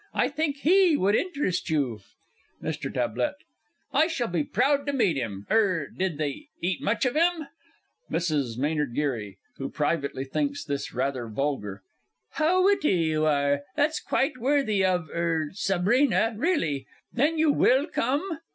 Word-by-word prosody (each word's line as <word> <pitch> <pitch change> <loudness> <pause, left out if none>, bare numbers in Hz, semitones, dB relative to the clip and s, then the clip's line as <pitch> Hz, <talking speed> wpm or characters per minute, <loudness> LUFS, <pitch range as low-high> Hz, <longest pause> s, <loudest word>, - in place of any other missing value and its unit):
I - - +2
think 290 0 -1
he 355 -1 +5
would 200 -2 +2
interest 280 - -1
you. 135 -8 0 0.6
MR. - - -4
T. 290 - -2 0.5
I 315 - +4
shall 255 -9 -2
be 170 -4 0
proud 280 - +1
to 285 - 0
meet 215 - +2
him. 105 -6 -4
Er 185 -9 +2
did 185 -5 -1
they 155 - -4
eat 180 -1 -1
much 230 +5 0
of 250 - +1
him? 330 -2 +1 0.6
MRS. 145 -9 -1
M. 150 -3 -1
G. 120 -10 -2 0.2
(who 135 - -4
privately 145 -3 -1
thinks 285 - -2
this 140 -1 -3
rather 130 -1 -2
vulgar). 110 -5 -3 0.5
How 360 +4 +2
witty 395 - +3
you 160 -2 +1
are! 140 -1 +2
That's 300 +1 +1
quite 265 -1 -1
worthy 240 -6 +2
of 180 -3 +1
er 165 -3 -1
Sabrina, 210 +5 +2
really! 210 - 0 0.3
Then 295 +7 +1
you 315 -1 +4
will 270 0 +3
come? 310 +5 -1
190 Hz, 150 wpm, -26 LUFS, -, 0.6 s, he